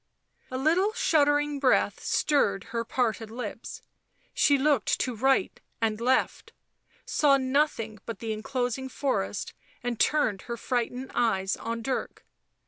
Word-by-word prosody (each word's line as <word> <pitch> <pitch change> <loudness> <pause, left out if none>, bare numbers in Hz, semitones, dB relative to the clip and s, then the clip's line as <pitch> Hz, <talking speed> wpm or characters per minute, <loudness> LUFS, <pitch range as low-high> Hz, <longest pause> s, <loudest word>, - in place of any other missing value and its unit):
A 255 - -4
little 345 +10 +2
shuddering 290 -5 +2
breath 265 -2 +2
stirred 200 -10 +1
her 230 0 0
parted 225 -2 -1
lips; 240 +3 -7 0.5
she 285 - +4
looked 275 -5 +2
to 250 -2 -1
right 265 -2 +1 0.2
and 225 -1 -1
left, 255 +2 0 0.5
saw 285 -2 +3
nothing 260 -5 0
but 230 -3 -4
the 225 +1 -3
enclosing 250 +3 -3
forest, 175 - -2 0.3
and 240 -2 -3
turned 255 -11 +2
her 235 - -3
frightened 250 +2 -2
eyes 195 -5 +1
on 230 0 -5
Dirk. 260 +2 -4
250 Hz, 130 wpm, -27 LUFS, 225-280 Hz, 0.5 s, she